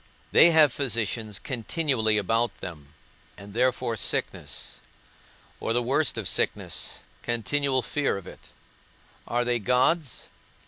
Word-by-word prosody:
They 170 - +7
have 155 -5 +5
physicians 115 -5 -1
continually 125 -3 0
about 115 +4 0
them, 75 -4 -9 0.4
and 100 0 -11
therefore 125 0 +1
sickness, 105 - -3 0.8
or 115 - -1
the 120 +1 +1
worst 135 +1 +1
of 110 -4 -2
sicknesses, - - -1 0.2
continual 130 +3 0
fear 145 +2 0
of 100 - -9
it. - - -13 0.8
Are 120 +1 0
they 120 -1 +1
gods? 130 - +1
120 Hz, 120 wpm, -26 LUFS, 110-135 Hz, 0.8 s, They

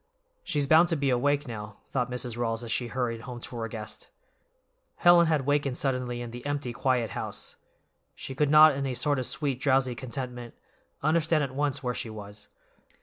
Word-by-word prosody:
"She's 145 -3 0
bound 160 +4 +6
to 170 - +1
be 140 -3 +1
awake, 145 +3 +1
now," 105 -3 -7
thought 125 -2 0
Mrs. 125 -1 -3
Rawls 115 -1 -2
as 115 - -5
she 120 - 0
hurried 120 -2 -2
home 120 +1 -7
to 120 - -5
her 115 -1 -3
guest. 110 -1 -7 0.9
Helen 175 -1 +6
had 155 -4 +1
wakened 145 -2 +1
suddenly 125 -3 -1
in 120 - -7
the 120 +1 -8
empty, 145 -4 -2
quiet 125 -3 0
house. - - -6 0.6
She - - -7
could 145 +2 +1
not, 155 0 +8
in 135 0 -2
a 130 - -2
sort 145 +2 +1
of 125 - -2
sweet, 140 -5 -2
drowsy 130 -2 +2
contentment, 125 -1 -6 0.5
understand 160 0 +2
at 135 -2 -4
once 140 0 -1
where 125 -1 -1
she 115 - -5
was. 105 -1 -9
130 Hz, 190 wpm, -28 LUFS, 120-145 Hz, 0.9 s, not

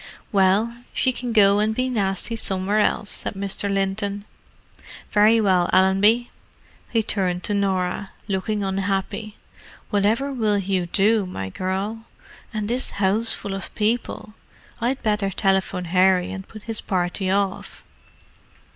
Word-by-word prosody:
"Well, 205 +4 +2 0.2
she 260 - +2
can 245 -1 -4
go 205 -2 +5
and 215 +1 +1
be 255 +2 0
nasty 210 -1 -2
somewhere 200 -1 0
else," 210 0 +1
said - - -4
Mr. 200 +1 -2
Linton. 200 +1 -1 0.9
"Very 215 +2 +5
well, 185 -4 +3
Allenby." 195 +6 +4 0.6
He 225 -2 +1
turned 180 -4 0
to 210 - 0
Norah, 190 -1 -1 0.2
looking 200 +1 -1
unhappy. 195 +2 -2 0.6
"Whatever 220 +7 +1
will 215 -5 +1
you 190 -2 -1
do, 205 +2 +2
my 95 - -5
girl?—and 205 - -5
this 245 +3 0
houseful 205 +1 0
of 195 - -7
people! 215 0 -1 0.5
I'd 250 +3 -1
better 210 -2 +1
telephone 190 -2 0
Harry 185 +1 +3
and 190 0 -7
put 215 -2 -11
his 225 -1 -3
party 185 +1 -1
off." 195 0 -2
200 Hz, 130 wpm, -23 LUFS, 190-220 Hz, 0.9 s, go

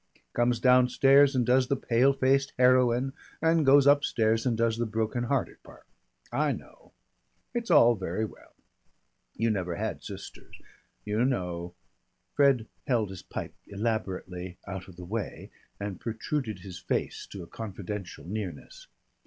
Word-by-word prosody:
Comes 120 0 +2
downstairs 135 +3 +5
and 125 -2 +2
does 125 +1 +3
the 140 - +1
pale 125 +1 +3
faced 135 +1 +1
heroine 125 +1 +4 0.3
and 165 0 +3
goes 140 0 +6
upstairs 120 -6 +3
and 115 -3 +1
does 115 -1 +1
the 120 - 0
broken 110 +2 -1
hearted 135 +1 -1
part. - - -16 0.5
I - - +1
know. - - -13 0.6
It's 235 -1 -3
all 120 +1 +7
very 95 +1 -2
well. - - -14 0.8
You 115 0 +1
never 90 -4 -2
had - - -3
sisters. - - -10 0.5
You 105 +3 +1
know 90 -9 -2 0.3
" 90 0 -49
Fred 135 -5 +4 0.2
held 115 -6 +1
his 95 - -8
pipe - - -6
elaborately 95 -4 -3
out 95 -1 -6
of 95 - -13
the 90 0 -9
way 105 +2 -5 0.3
and 100 -2 -5
protruded 110 -2 -3
his 90 -2 -8
face - - -3
to 95 -3 -8
a - - -11
confidential 100 -4 -7
nearness. 110 - -6
115 Hz, 145 wpm, -28 LUFS, 95-130 Hz, 0.8 s, all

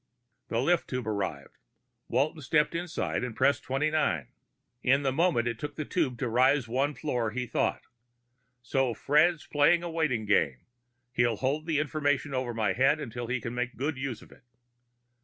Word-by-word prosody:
The 115 - -1
lift 170 +8 +2
tube 125 -2 -3
arrived. 95 -10 -4 0.5
Walton 145 +6 0
stepped 150 +4 +2
inside 170 -4 -2
and 125 -3 -4
pressed 140 +3 +3
twenty 135 +4 0
nine. 120 - 0 0.5
In 135 +3 +3
the 135 - +1
moment 145 -5 +2
it 115 -2 -3
took 145 -1 -5
for 155 - -3
the - - -14
tube 140 -9 0
to 125 - -2
rise 130 +3 +3
the 115 - -13
one 140 +4 +1
floor, 125 -7 -1
he 125 +3 -3
thought, 120 - -1 0.8
_So 125 0 0
Fred's 155 +3 +3
playing 160 +4 +3
a 170 - -4
waiting 150 -9 0
game.... 70 -11 +1 0.5
He'll 120 -2 +2
hold 140 +7 -1
the 160 -3 +1
information 145 -1 0
over 130 -2 -1
my 105 -4 +1
head 135 +6 +3
until 120 -4 -5
he 130 +1 -1
can 115 +1 -5
make 125 +1 -3
good 145 +4 -1
use 130 -3 -5
of - - -18
it. - - -17
135 Hz, 185 wpm, -29 LUFS, 120-150 Hz, 0.8 s, pressed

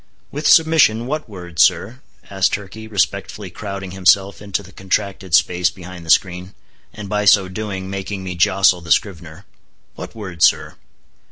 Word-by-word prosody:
"With 150 +2 -2
submission, 160 -9 +4
what 150 -1 -4
word, 90 -5 -10
sir," 125 +7 +2 0.3
asked 95 -1 +1
Turkey, 105 +2 -6
respectfully 100 -1 -2
crowding 100 -1 -7
himself 95 +2 +2
into 100 -1 -4
the 95 - -15
contracted 95 -1 -2
space 90 0 +2
behind 90 -1 -11
the - - -10
screen, 90 +2 +1 0.4
and 105 -1 -9
by 105 +1 -1
so 95 -1 +5
doing, 95 -1 -6
making 95 0 -5
me 90 -1 -5
jostle 90 +1 +3
the 85 0 -8
scrivener. 85 -2 -1 0.5
"What - - -10
word, 95 -7 -9
sir?" - - +3
95 Hz, 155 wpm, -19 LUFS, 90-105 Hz, 0.5 s, so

